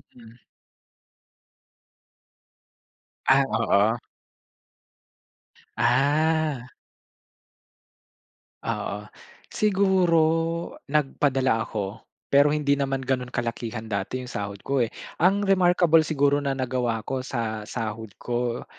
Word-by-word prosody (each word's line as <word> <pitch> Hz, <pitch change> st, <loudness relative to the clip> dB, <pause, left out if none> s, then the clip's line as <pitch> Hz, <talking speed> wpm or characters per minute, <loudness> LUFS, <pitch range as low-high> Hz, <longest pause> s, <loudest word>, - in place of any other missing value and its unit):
Mhm. 115 Hz, -1 st, -15 dB, 2.9 s
Ah, 135 Hz, +1 st, +5 dB
oo. 110 Hz, -1 st, +2 dB, 1.8 s
Ah. 145 Hz, +1 st, +2 dB, 2.0 s
Oo. 105 Hz, +1 st, -3 dB, 0.5 s
Siguro, 190 Hz, -4 st, +3 dB, 0.7 s
nagpadala 135 Hz, -4 st, +1 dB
ako, 100 Hz, -1 st, -5 dB, 0.3 s
pero 140 Hz, +1 st, +5 dB
hindi 145 Hz, -2 st, +2 dB
naman 135 Hz, -1 st, -2 dB
gano’n 125 Hz, -1 st, -1 dB
kalakihan 115 Hz, -1 st, -4 dB
dati 100 Hz, +4 st, -3 dB
yung 125 Hz, -, -7 dB
sahod 100 Hz, -1 st, -4 dB
ko, 135 Hz, -2 st, +1 dB
eh. 115 Hz, -, -2 dB, 0.3 s
Ang 200 Hz, +3 st, +3 dB
remarkable 175 Hz, -4 st, +4 dB
siguro 145 Hz, -1 st, +2 dB
na 135 Hz, -1 st, -2 dB
nagawa 125 Hz, -3 st, -1 dB
ko 130 Hz, -1 st, -2 dB
sa 110 Hz, -4 st, -3 dB
sahod 110 Hz, -2 st, -5 dB
ko 120 Hz, 0 st, -2 dB
130 Hz, 85 wpm, -25 LUFS, 115-150 Hz, 2.9 s, Ah